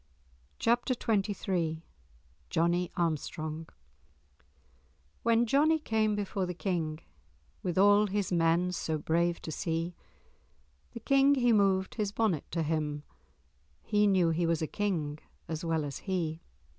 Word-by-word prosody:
*Chapter 245 Hz, +2 st, +1 dB
XXIII* 195 Hz, -7 st, -1 dB, 0.7 s
*Johnie 170 Hz, +2 st, +1 dB
Armstrong* 160 Hz, -1 st, -2 dB, 1.5 s
"When 230 Hz, 0 st, +3 dB
Johnie 300 Hz, +7 st, +3 dB
came 220 Hz, -7 st, 0 dB
before 195 Hz, -2 st, -2 dB
the 180 Hz, -, -4 dB
King, 165 Hz, -4 st, -2 dB, 0.6 s
With 180 Hz, -1 st, -3 dB
all 205 Hz, +2 st, +5 dB
his 200 Hz, -1 st, -2 dB
men 170 Hz, +1 st, +2 dB
so 160 Hz, -3 st, -2 dB
brave 170 Hz, +3 st, 0 dB
to 160 Hz, -, -5 dB
see, 165 Hz, +2 st, -2 dB, 1.0 s
The 235 Hz, -, -7 dB
King 275 Hz, +2 st, +4 dB
he 245 Hz, -3 st, +3 dB
moved 195 Hz, -2 st, +2 dB
his 210 Hz, -3 st, -2 dB
bonnet 205 Hz, -8 st, 0 dB
to 165 Hz, 0 st, -1 dB
him; 150 Hz, -2 st, -2 dB, 0.8 s
He 210 Hz, -1 st, +2 dB
knew 185 Hz, -4 st, +3 dB
he 170 Hz, +1 st, 0 dB
was 165 Hz, -1 st, 0 dB
a -, -, +2 dB
King 155 Hz, -6 st, -2 dB, 0.3 s
as 160 Hz, 0 st, -4 dB
well 160 Hz, -2 st, 0 dB
as 140 Hz, -, -5 dB
he." 170 Hz, -4 st, -2 dB
180 Hz, 130 wpm, -30 LUFS, 160-210 Hz, 1.5 s, all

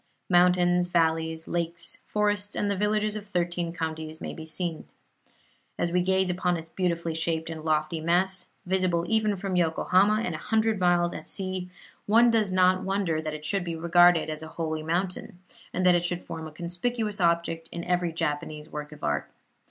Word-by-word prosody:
Mountains, 180 Hz, 0 st, +4 dB
valleys, 160 Hz, -1 st, 0 dB
lakes, 170 Hz, 0 st, -3 dB
forests 205 Hz, -1 st, 0 dB
and 205 Hz, -, 0 dB
the -, -, 0 dB
villages 210 Hz, +1 st, +1 dB
of 210 Hz, -1 st, -6 dB
thirteen 175 Hz, -2 st, -1 dB
counties 160 Hz, -1 st, -4 dB
may -, -, -5 dB
be 160 Hz, 0 st, -9 dB
seen. 165 Hz, 0 st, -3 dB, 0.9 s
As 170 Hz, -, 0 dB
we 180 Hz, +1 st, +2 dB
gaze 190 Hz, 0 st, +2 dB
upon 180 Hz, -1 st, 0 dB
its 165 Hz, 0 st, -10 dB
beautifully 170 Hz, -3 st, -1 dB
shaped 160 Hz, 0 st, -1 dB
and 160 Hz, -1 st, -7 dB
lofty 155 Hz, +1 st, 0 dB
mass, 180 Hz, +3 st, +1 dB, 0.2 s
visible 180 Hz, -2 st, +1 dB
even 220 Hz, -2 st, +2 dB
from 195 Hz, 0 st, -3 dB
Yokohama 185 Hz, +5 st, +3 dB
and 175 Hz, -, -2 dB
a 155 Hz, -, -5 dB
hundred 220 Hz, +1 st, +1 dB
miles 175 Hz, -1 st, +3 dB
at -, -, -7 dB
sea, 185 Hz, -2 st, -2 dB, 0.4 s
one 230 Hz, +3 st, +6 dB
does 215 Hz, -4 st, +2 dB
not 185 Hz, 0 st, +4 dB
wonder 190 Hz, -5 st, 0 dB
that 155 Hz, -1 st, -4 dB
it 150 Hz, 0 st, -8 dB
should 195 Hz, +4 st, 0 dB
be 170 Hz, -1 st, -4 dB
regarded 170 Hz, 0 st, +5 dB
as 155 Hz, 0 st, -4 dB
a 160 Hz, -, -7 dB
holy 160 Hz, -2 st, -2 dB
mountain, 175 Hz, +3 st, -2 dB, 0.3 s
and 185 Hz, -, -1 dB
that 180 Hz, -, +7 dB
it 175 Hz, -1 st, +2 dB
should 175 Hz, 0 st, -2 dB
form 160 Hz, -1 st, -6 dB
a -, -, -10 dB
conspicuous 200 Hz, +6 st, -2 dB
object 170 Hz, -1 st, +1 dB
in 170 Hz, -, -5 dB
every 180 Hz, -1 st, 0 dB
Japanese 150 Hz, -1 st, -3 dB
work 150 Hz, 0 st, -6 dB
of 150 Hz, -, -13 dB
art. 75 Hz, -1 st, -1 dB
175 Hz, 185 wpm, -27 LUFS, 160-190 Hz, 0.9 s, that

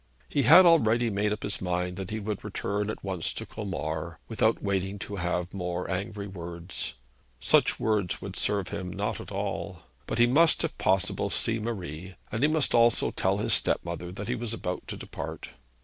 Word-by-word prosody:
He 145 Hz, -, 0 dB
had 160 Hz, +9 st, +8 dB
already 120 Hz, -8 st, +4 dB
made 105 Hz, +1 st, 0 dB
up 105 Hz, -, -3 dB
his 105 Hz, -, -1 dB
mind 90 Hz, 0 st, -1 dB
that 95 Hz, -1 st, -5 dB
he 110 Hz, -, -3 dB
would 105 Hz, -1 st, -4 dB
return 105 Hz, +1 st, -2 dB
at 110 Hz, -, -5 dB
once 95 Hz, -4 st, -1 dB
to -, -, -5 dB
Colmar, 85 Hz, -5 st, -4 dB
without -, -, +1 dB
waiting 100 Hz, 0 st, -1 dB
to 100 Hz, +1 st, -6 dB
have 90 Hz, 0 st, -2 dB
more 90 Hz, -2 st, -3 dB
angry 100 Hz, +2 st, -3 dB
words. 85 Hz, -4 st, -3 dB, 0.4 s
Such 60 Hz, -, +3 dB
words 105 Hz, -5 st, +1 dB
would -, -, -7 dB
serve 100 Hz, -3 st, +1 dB
him 90 Hz, -2 st, -5 dB
not 105 Hz, +3 st, -3 dB
at -, -, -10 dB
all. 100 Hz, -2 st, -4 dB, 0.2 s
But -, -, -2 dB
he 120 Hz, -, +6 dB
must 155 Hz, +8 st, +5 dB
if 165 Hz, -, -2 dB
possible 95 Hz, 0 st, +1 dB
see 115 Hz, 0 st, +2 dB
Marie, 95 Hz, -5 st, -5 dB, 0.2 s
and 110 Hz, -, -2 dB
he 145 Hz, -, +5 dB
must 155 Hz, -3 st, +3 dB
also 115 Hz, 0 st, +4 dB
tell -, -, +1 dB
his -, -, +2 dB
stepmother 85 Hz, +1 st, 0 dB
that 100 Hz, +2 st, -6 dB
he 125 Hz, -, 0 dB
was 120 Hz, -2 st, -3 dB
about 90 Hz, -4 st, -5 dB
to -, -, -5 dB
depart. -, -, -7 dB
100 Hz, 190 wpm, -28 LUFS, 90-110 Hz, 0.4 s, had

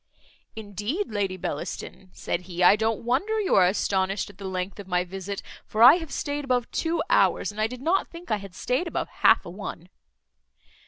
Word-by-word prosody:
"Indeed, 220 Hz, -, -4 dB
Lady 195 Hz, -3 st, -1 dB
Bellaston," 185 Hz, +3 st, -5 dB
said 175 Hz, -, -3 dB
he, 175 Hz, 0 st, -1 dB
"I 180 Hz, -, +8 dB
don't 220 Hz, +1 st, -1 dB
wonder 390 Hz, -, +1 dB
you 405 Hz, -, 0 dB
are 185 Hz, -2 st, +6 dB
astonished 195 Hz, +1 st, 0 dB
at 200 Hz, -, -27 dB
the 200 Hz, -, -7 dB
length 185 Hz, +2 st, -4 dB
of 200 Hz, -, -8 dB
my 180 Hz, -1 st, +1 dB
visit; 195 Hz, +2 st, -6 dB, 0.2 s
for 220 Hz, +2 st, +1 dB
I 260 Hz, +8 st, +10 dB
have 325 Hz, -5 st, -7 dB
staid 290 Hz, 0 st, -3 dB
above 250 Hz, -3 st, 0 dB
two 330 Hz, 0 st, 0 dB
hours, -, -, +3 dB
and 210 Hz, +1 st, -5 dB
I 215 Hz, -, +3 dB
did 250 Hz, +2 st, -9 dB
not 365 Hz, +5 st, +2 dB
think 340 Hz, -3 st, -10 dB
I 215 Hz, -, +3 dB
had 195 Hz, -2 st, -11 dB
staid 255 Hz, -, -1 dB
above -, -, -3 dB
half -, -, +5 dB
a 175 Hz, -, -7 dB
one." 185 Hz, -2 st, -7 dB
210 Hz, 200 wpm, -26 LUFS, 190-260 Hz, 0.2 s, I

